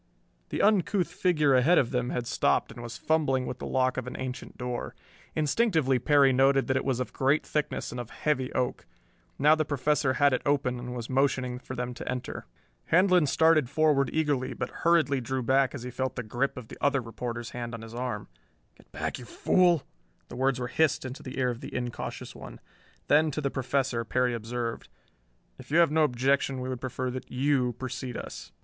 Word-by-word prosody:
The -, -, -1 dB
uncouth 200 Hz, -3 st, +3 dB
figure 170 Hz, -6 st, +2 dB
ahead 130 Hz, +8 st, +5 dB
of 120 Hz, -, +2 dB
them 125 Hz, -1 st, -1 dB
had 120 Hz, -, -2 dB
stopped -, -, +1 dB
and 120 Hz, -, -9 dB
was 120 Hz, 0 st, -7 dB
fumbling 140 Hz, -5 st, +1 dB
with -, -, -5 dB
the -, -, -5 dB
lock 130 Hz, -1 st, +1 dB
of 130 Hz, -1 st, -3 dB
an 125 Hz, -, -6 dB
ancient 130 Hz, -1 st, -6 dB
door. 125 Hz, -1 st, -4 dB, 0.4 s
Instinctively 155 Hz, -, +2 dB
Perry 140 Hz, -2 st, +4 dB
noted 135 Hz, +1 st, +4 dB
that 130 Hz, -, 0 dB
it 130 Hz, -, +1 dB
was 130 Hz, -2 st, 0 dB
of 125 Hz, -, -4 dB
great 140 Hz, +3 st, +2 dB
thickness 150 Hz, -1 st, -2 dB
and 125 Hz, -, -5 dB
of 120 Hz, -1 st, -6 dB
heavy 130 Hz, -4 st, -1 dB
oak. 125 Hz, -1 st, -2 dB, 0.5 s
Now 150 Hz, +2 st, +5 dB
the 155 Hz, 0 st, +2 dB
Professor 145 Hz, -1 st, +1 dB
had 145 Hz, 0 st, +3 dB
it 130 Hz, -, 0 dB
open 135 Hz, -4 st, 0 dB
and 125 Hz, 0 st, -6 dB
was 120 Hz, -2 st, -5 dB
motioning 130 Hz, -2 st, 0 dB
for 130 Hz, -, -8 dB
them 125 Hz, 0 st, -3 dB
to -, -, -7 dB
enter. 125 Hz, -1 st, -5 dB, 0.4 s
Handlon 180 Hz, -2 st, +4 dB
started 160 Hz, -3 st, +4 dB
forward 145 Hz, -1 st, +3 dB
eagerly, 140 Hz, -5 st, 0 dB
but 125 Hz, +1 st, -4 dB
hurriedly 160 Hz, -5 st, +3 dB
drew 130 Hz, +2 st, -2 dB
back 135 Hz, +3 st, +2 dB
as 125 Hz, -, -7 dB
he 125 Hz, -, -5 dB
felt 130 Hz, +1 st, -2 dB
the 125 Hz, -, -3 dB
grip 120 Hz, +5 st, -2 dB
of 125 Hz, -3 st, -8 dB
the -, -, -10 dB
other 140 Hz, -1 st, +3 dB
reporter's 115 Hz, 0 st, -5 dB
hand 120 Hz, -1 st, -5 dB
on 115 Hz, -, -9 dB
his 115 Hz, 0 st, -10 dB
arm. 125 Hz, +1 st, -4 dB, 0.5 s
"Get -, -, -23 dB
back, 80 Hz, -, -4 dB
you 125 Hz, -, -9 dB
fool!" 175 Hz, +3 st, +3 dB, 0.5 s
The -, -, -8 dB
words 130 Hz, 0 st, +1 dB
were 125 Hz, -, -2 dB
hissed 150 Hz, +1 st, +1 dB
into 130 Hz, +1 st, -6 dB
the 130 Hz, -, -8 dB
ear 125 Hz, -1 st, +1 dB
of 120 Hz, -, -8 dB
the -, -, -8 dB
incautious 125 Hz, -1 st, -5 dB
one. -, -, -10 dB, 0.5 s
Then, 155 Hz, +2 st, +4 dB
to 150 Hz, -, -3 dB
the 140 Hz, -2 st, -1 dB
Professor, 130 Hz, -2 st, -1 dB
Perry 125 Hz, +2 st, +1 dB
observed: 115 Hz, 0 st, -4 dB, 0.7 s
"If 130 Hz, -, -12 dB
you 155 Hz, -, +2 dB
have 170 Hz, -3 st, +5 dB
no 160 Hz, +1 st, +3 dB
objection 135 Hz, 0 st, +1 dB
we 130 Hz, 0 st, -4 dB
would 130 Hz, -2 st, -4 dB
prefer 130 Hz, 0 st, -3 dB
that 130 Hz, +1 st, -7 dB
you 130 Hz, -1 st, +1 dB
precede 125 Hz, 0 st, -5 dB
us." -, -, -8 dB
130 Hz, 205 wpm, -28 LUFS, 125-145 Hz, 0.7 s, ahead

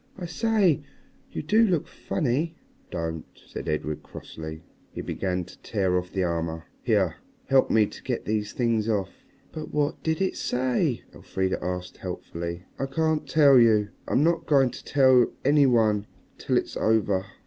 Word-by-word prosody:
I 180 Hz, -, -5 dB
say, 195 Hz, -, +2 dB, 0.5 s
you -, -, -4 dB
do 215 Hz, +9 st, +4 dB
look 180 Hz, -8 st, +1 dB
funny." 155 Hz, +3 st, -1 dB, 0.3 s
"Don't!" 80 Hz, -1 st, -3 dB, 0.2 s
said -, -, -6 dB
Edred 75 Hz, 0 st, -2 dB
crossly. 80 Hz, 0 st, -9 dB, 0.3 s
He -, -, -6 dB
began 90 Hz, -2 st, -2 dB
to 90 Hz, -, -15 dB
tear 95 Hz, -4 st, 0 dB
off 90 Hz, 0 st, -1 dB
the 95 Hz, -, 0 dB
armor. 80 Hz, -2 st, -2 dB, 0.2 s
"Here, -, -, +1 dB, 0.3 s
help 135 Hz, -1 st, +4 dB
me 110 Hz, -1 st, +4 dB
to -, -, -10 dB
get -, -, -3 dB
these 105 Hz, -1 st, -1 dB
things 115 Hz, -3 st, 0 dB
off." 100 Hz, -4 st, 0 dB, 0.4 s
"But 155 Hz, -, -7 dB
what 150 Hz, -1 st, 0 dB
did 160 Hz, +1 st, -1 dB
it 190 Hz, -1 st, 0 dB
say?" 130 Hz, +2 st, 0 dB
Elfrida 95 Hz, -1 st, -2 dB
asked, 90 Hz, 0 st, -4 dB
helpfully. 85 Hz, +1 st, -5 dB, 0.2 s
"I 135 Hz, -, -1 dB
can't 160 Hz, +2 st, 0 dB
tell 140 Hz, -4 st, +6 dB
you. 110 Hz, -3 st, +4 dB, 0.2 s
I'm 140 Hz, -, +2 dB
not 170 Hz, +1 st, +1 dB
going 135 Hz, -4 st, +4 dB
to -, -, -10 dB
tell 130 Hz, -4 st, +4 dB
any 145 Hz, 0 st, +5 dB
one 110 Hz, -4 st, +2 dB, 0.3 s
till -, -, +1 dB
it's -, -, -2 dB
over." 105 Hz, -4 st, +2 dB
115 Hz, 160 wpm, -26 LUFS, 90-150 Hz, 0.5 s, tell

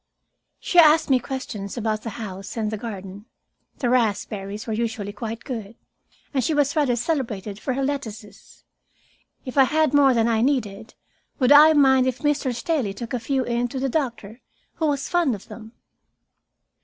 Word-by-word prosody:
She 355 Hz, -, +2 dB
asked 310 Hz, -2 st, +6 dB
me 260 Hz, -, +5 dB
questions 245 Hz, -6 st, -6 dB
about 215 Hz, -2 st, -1 dB
the 230 Hz, -, -5 dB
house 195 Hz, -2 st, -7 dB
and 215 Hz, -1 st, -1 dB
the 215 Hz, -, -3 dB
garden. 200 Hz, -2 st, -8 dB, 0.5 s
The 250 Hz, -, -1 dB
raspberries 210 Hz, -3 st, -1 dB
were 225 Hz, -, -3 dB
usually 220 Hz, -2 st, -3 dB
quite 225 Hz, +2 st, -6 dB
good, 225 Hz, -5 st, -6 dB, 0.6 s
and 265 Hz, -2 st, +1 dB
she 310 Hz, -, 0 dB
was 285 Hz, -1 st, +1 dB
rather 285 Hz, -6 st, +2 dB
celebrated 225 Hz, -, -3 dB
for 260 Hz, +2 st, -3 dB
her 275 Hz, -, -1 dB
lettuces. 220 Hz, -7 st, -6 dB, 0.8 s
If 260 Hz, +1 st, -1 dB
I 265 Hz, -, +7 dB
had 310 Hz, +1 st, +1 dB
more 275 Hz, -3 st, +5 dB
than 230 Hz, 0 st, +2 dB
I 225 Hz, -1 st, +1 dB
needed, 225 Hz, -5 st, -1 dB, 0.4 s
would 255 Hz, -1 st, +2 dB
I 305 Hz, +2 st, +8 dB
mind 265 Hz, -3 st, +4 dB
if 255 Hz, -1 st, -1 dB
Mr. 295 Hz, -3 st, 0 dB
Staley 240 Hz, -, -2 dB
took 235 Hz, +3 st, -7 dB
a 250 Hz, -, 0 dB
few 260 Hz, +3 st, -1 dB
in 240 Hz, 0 st, -1 dB
to 260 Hz, +2 st, -5 dB
the 270 Hz, +1 st, -1 dB
doctor, 235 Hz, -5 st, -3 dB, 0.4 s
who 320 Hz, -, 0 dB
was 280 Hz, -2 st, -1 dB
fond 340 Hz, -9 st, +1 dB
of 200 Hz, -, -14 dB
them. 220 Hz, -1 st, -10 dB
245 Hz, 175 wpm, -23 LUFS, 215-275 Hz, 0.8 s, I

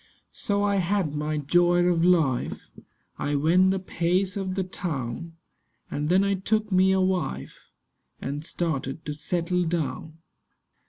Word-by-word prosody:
So 200 Hz, 0 st, -1 dB
I 200 Hz, -1 st, +2 dB
had 185 Hz, -4 st, 0 dB
my 150 Hz, +1 st, -2 dB
joy 175 Hz, +4 st, +3 dB
of 175 Hz, -2 st, +2 dB
life: 160 Hz, -8 st, +1 dB, 0.5 s
I 145 Hz, -, -1 dB
went 170 Hz, +6 st, +4 dB
the 190 Hz, -, +1 dB
pace 185 Hz, +1 st, 0 dB
of 190 Hz, -2 st, -3 dB
the 190 Hz, -, 0 dB
town; 165 Hz, -4 st, -4 dB, 0.6 s
And 150 Hz, +1 st, -2 dB
then 185 Hz, +2 st, +4 dB
I 200 Hz, 0 st, +1 dB
took 210 Hz, +3 st, -1 dB
me 190 Hz, +1 st, +4 dB
a 190 Hz, -, +3 dB
wife, 180 Hz, -, -2 dB, 0.5 s
And 145 Hz, +2 st, -4 dB
started 160 Hz, -3 st, -3 dB
to 150 Hz, -, -3 dB
settle 170 Hz, +4 st, -1 dB
down. 160 Hz, -2 st, -3 dB
175 Hz, 145 wpm, -26 LUFS, 150-190 Hz, 0.6 s, went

